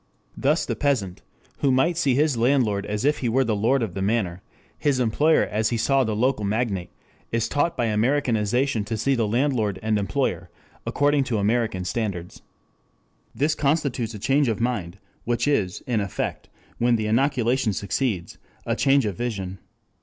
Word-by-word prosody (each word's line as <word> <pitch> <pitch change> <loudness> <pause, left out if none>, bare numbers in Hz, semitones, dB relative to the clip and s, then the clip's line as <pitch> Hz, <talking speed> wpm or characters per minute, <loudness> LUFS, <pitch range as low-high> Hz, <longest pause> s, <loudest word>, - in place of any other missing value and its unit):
Thus 150 +4 +1
the - - -2
peasant 115 -11 -1 0.4
who 140 - +2
might 135 +7 +2
see 140 -6 +2
his 150 0 +2
landlord 115 -5 +1
as 105 +4 -2
if 150 +1 +2
he 120 - -1
were 130 +4 +3
the 110 -3 0
lord 120 +5 +2
of 105 -6 -4
the 95 - -4
manor, 95 -4 0 0.3
his 145 -4 0
employer 145 +7 +3
as 110 +1 0
he 120 - -1
saw 135 +4 +2
the 110 -3 -1
local 125 0 +1
magnate, 100 -3 -1 0.4
is 115 -1 0
taught 150 +4 0
by 120 - +1
Americanization 115 0 +1
to 110 +1 -3
see 135 +6 +1
the 115 -4 +1
landlord 115 -4 0
and 110 -1 +1
employer 100 -3 -1 0.4
according 145 0 +2
to 115 -3 -1
American 105 -2 0
standards. 90 -5 -4 0.9
This 145 +6 +1
constitutes 140 -7 0
a - - -5
change 135 +7 +2
of 110 -3 -1
mind, 105 -7 -2 0.3
which 120 +2 0
is, 100 -11 0
in 120 -5 0
effect, 100 -2 -4 0.3
when 120 0 +3
the 110 -1 -1
inoculation 125 0 +1
succeeds, 100 -1 -2 0.3
a - - 0
change 135 -2 +3
of 100 -3 -2
vision. 95 -5 -4
115 Hz, 170 wpm, -24 LUFS, 105-135 Hz, 0.9 s, were